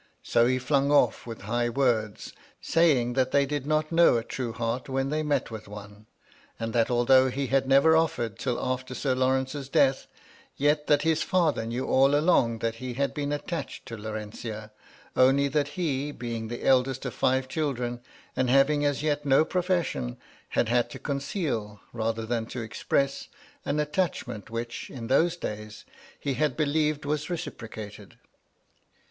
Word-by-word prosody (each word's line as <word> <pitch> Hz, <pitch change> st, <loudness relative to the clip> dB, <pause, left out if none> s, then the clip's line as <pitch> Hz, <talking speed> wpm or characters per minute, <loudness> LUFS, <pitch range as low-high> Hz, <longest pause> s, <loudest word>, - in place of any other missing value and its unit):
So 120 Hz, 0 st, +3 dB
he 130 Hz, +1 st, +2 dB
flung 140 Hz, +2 st, +1 dB
off 145 Hz, -3 st, +3 dB
with 115 Hz, -1 st, -7 dB
high 120 Hz, +4 st, -1 dB
words, 115 Hz, -5 st, 0 dB, 0.3 s
saying 140 Hz, -8 st, +2 dB
that 130 Hz, 0 st, +1 dB
they 140 Hz, +1 st, +3 dB
did 145 Hz, -1 st, -3 dB
not 155 Hz, +1 st, +1 dB
know 165 Hz, -6 st, +5 dB
a 115 Hz, -, -2 dB
true 120 Hz, 0 st, -4 dB
heart 115 Hz, +3 st, -3 dB
when 135 Hz, 0 st, -1 dB
they 155 Hz, +1 st, 0 dB
met 150 Hz, -5 st, -1 dB
with 110 Hz, -2 st, -8 dB
one; 105 Hz, +1 st, -11 dB, 0.5 s
and 115 Hz, 0 st, -3 dB
that, 115 Hz, -1 st, +2 dB
although 130 Hz, +2 st, +4 dB
he 135 Hz, +2 st, -2 dB
had 135 Hz, 0 st, +1 dB
never 140 Hz, +4 st, +5 dB
offered 120 Hz, -10 st, 0 dB
till 125 Hz, -3 st, -1 dB
after 130 Hz, 0 st, -3 dB
Sir 135 Hz, 0 st, 0 dB
Lawrence's 130 Hz, +2 st, 0 dB
death, 135 Hz, -1 st, +2 dB, 0.5 s
yet 150 Hz, +1 st, +2 dB
that 145 Hz, -1 st, +3 dB
his 160 Hz, -1 st, +2 dB
father 160 Hz, -11 st, +1 dB
knew 120 Hz, +3 st, -2 dB
all 135 Hz, +2 st, +4 dB
along 145 Hz, -7 st, +3 dB
that 115 Hz, 0 st, -1 dB
he 125 Hz, 0 st, -6 dB
had 140 Hz, +2 st, 0 dB
been 145 Hz, -1 st, -3 dB
attached 145 Hz, 0 st, -4 dB
to 120 Hz, -3 st, -7 dB
Laurentia, 110 Hz, 0 st, -6 dB, 0.4 s
only 135 Hz, +2 st, +4 dB
that 145 Hz, 0 st, 0 dB
he, 145 Hz, -5 st, -1 dB
being 115 Hz, -4 st, -5 dB
the 120 Hz, +1 st, -6 dB
eldest 130 Hz, 0 st, +2 dB
of 125 Hz, -, -3 dB
five 130 Hz, 0 st, +1 dB
children, 125 Hz, -5 st, -2 dB, 0.3 s
and 130 Hz, -1 st, +1 dB
having 140 Hz, +3 st, +4 dB
as 145 Hz, 0 st, 0 dB
yet 150 Hz, -1 st, 0 dB
no 140 Hz, +2 st, +4 dB
profession, 175 Hz, -, -1 dB, 0.3 s
had -, -, +1 dB
had 120 Hz, +1 st, +2 dB
to -, -, -8 dB
conceal, 140 Hz, -, -3 dB
rather 115 Hz, -1 st, -2 dB
than 115 Hz, -1 st, -2 dB
to 120 Hz, 0 st, -5 dB
express, 135 Hz, +5 st, -1 dB, 0.4 s
an 145 Hz, +2 st, 0 dB
attachment, 150 Hz, -, -2 dB
which, 115 Hz, +1 st, -5 dB
in 120 Hz, -4 st, -7 dB
those 165 Hz, +8 st, +2 dB
days, 105 Hz, -6 st, -7 dB, 0.3 s
he 140 Hz, -, -2 dB
had 145 Hz, -2 st, 0 dB
believed 150 Hz, 0 st, +1 dB
was 150 Hz, +2 st, -2 dB
reciprocated. 110 Hz, -, -7 dB
130 Hz, 165 wpm, -27 LUFS, 115-145 Hz, 0.5 s, know